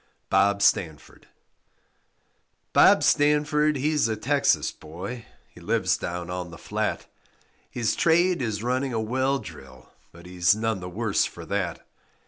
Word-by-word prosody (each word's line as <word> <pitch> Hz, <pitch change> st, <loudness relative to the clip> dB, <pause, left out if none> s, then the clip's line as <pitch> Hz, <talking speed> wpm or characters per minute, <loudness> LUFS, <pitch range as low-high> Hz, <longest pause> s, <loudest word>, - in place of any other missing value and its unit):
BOB 100 Hz, +1 st, +3 dB
STANFORD 80 Hz, -6 st, -1 dB, 1.5 s
Bob -, -, +6 dB
Stanford, 150 Hz, 0 st, +2 dB
he's 150 Hz, 0 st, +1 dB
a 110 Hz, -, -1 dB
Texas 140 Hz, +6 st, +1 dB
boy, 95 Hz, +10 st, -9 dB, 0.2 s
He -, -, -17 dB
lives -, -, +1 dB
down 90 Hz, -1 st, -5 dB
on 90 Hz, -1 st, -5 dB
the 85 Hz, -, -11 dB
flat; -, -, -3 dB, 0.6 s
His 120 Hz, -3 st, -1 dB
trade 175 Hz, 0 st, +2 dB
is 110 Hz, -3 st, -3 dB
running 130 Hz, +2 st, -1 dB
a 115 Hz, -, -1 dB
well 130 Hz, +5 st, 0 dB
drill, 65 Hz, -, -12 dB, 0.2 s
But 85 Hz, +1 st, -15 dB
he's 90 Hz, +1 st, +2 dB
none 110 Hz, -2 st, -2 dB
the 90 Hz, 0 st, -7 dB
worse 105 Hz, +2 st, 0 dB
for 85 Hz, -, -9 dB
that. 95 Hz, -4 st, -3 dB
110 Hz, 135 wpm, -25 LUFS, 90-135 Hz, 1.5 s, Bob